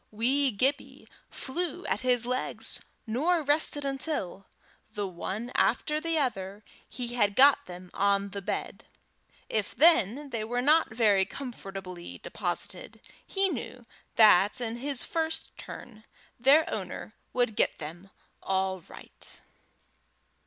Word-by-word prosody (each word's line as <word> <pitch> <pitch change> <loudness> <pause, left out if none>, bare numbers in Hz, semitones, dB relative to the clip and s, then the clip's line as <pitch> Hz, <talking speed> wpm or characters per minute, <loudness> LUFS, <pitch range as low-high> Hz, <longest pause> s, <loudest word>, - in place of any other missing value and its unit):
Wee 260 +6 +2
Gibbie 265 +6 -1 0.2
flew 330 +3 -4
at - - 0
his 250 -2 +2
legs, 250 +1 -3 0.2
nor 310 +9 +1
rested 290 0 +2
until, 270 - -2 0.4
the 205 -1 -3
one 195 +6 -5
after 305 0 +1
the 330 0 +1
other, 205 -7 -2 0.3
he 245 -2 -4
had 205 -4 +2
got 275 +3 +6
them 180 0 -10
on 200 0 +1
the 200 0 -5
bed; 200 +2 -4 0.6
if 215 -3 -2
then 285 - +4
they 230 -2 -2
were 240 +3 -2
not 300 +2 +4
very 215 -4 +4
comfortably 195 -8 -7
deposited, - - -4 0.3
he 390 0 +2
knew 255 -6 -5 0.3
that, 210 +1 +6
in 235 -1 -3
his 275 +1 -1
first 320 -1 -2
turn, 215 -3 -10 0.4
their 280 +6 +5
owner - - -5 0.2
would 245 -4 +1
get - - +2
them 170 +5 -8 0.3
all 190 0 0
right. - - -10
240 Hz, 125 wpm, -29 LUFS, 200-280 Hz, 0.6 s, got